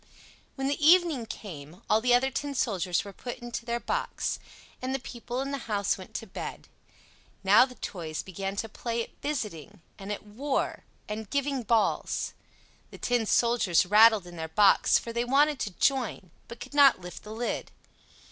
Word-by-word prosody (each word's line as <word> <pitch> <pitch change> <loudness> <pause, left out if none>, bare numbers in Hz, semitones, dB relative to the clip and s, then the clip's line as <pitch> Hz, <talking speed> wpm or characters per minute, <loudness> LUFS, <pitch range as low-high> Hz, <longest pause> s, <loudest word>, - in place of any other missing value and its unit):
When 270 -1 -2
the 290 +2 -1
evening 320 -7 +5
came, 170 -6 -9
all 215 +1 +3
the 245 +1 +4
other 265 +2 +2
tin 285 +1 -3
soldiers 185 -8 0
were 200 - -9
put 245 +5 -6
into 240 -1 -6
their 235 0 -1
box, 485 - -2 0.4
and 260 +1 -2
the - - -2
people 245 0 -5
in 275 +1 -3
the 280 - -2
house 200 -2 +1
went - - -12
to - - -3
bed. - - -7 0.8
Now 200 +6 +7
the 255 -1 -12
toys 165 -8 -5
began 195 +1 -5
to 225 - -3
play 230 +1 -3
at - - -16
"visiting," 210 - -4 0.2
and 195 +1 -6
at 205 - -5
"war," 260 +8 -2 0.2
and 210 0 -5
"giving 280 -1 0
balls." 230 -1 0 0.6
The - - -11
tin 245 -3 0
soldiers 230 -10 +3
rattled 215 0 +6
in 175 -1 -11
their 160 0 -4
box, 195 +5 +5
for 230 - -6
they 235 +1 0
wanted 280 +3 +3
to 205 - -3
join, 245 - 0 0.2
but 235 0 -10
could - - -9
not 285 -5 +6
lift 180 -1 -9
the 210 - -10
lid. 230 +2 -3
230 Hz, 180 wpm, -28 LUFS, 200-265 Hz, 0.8 s, Now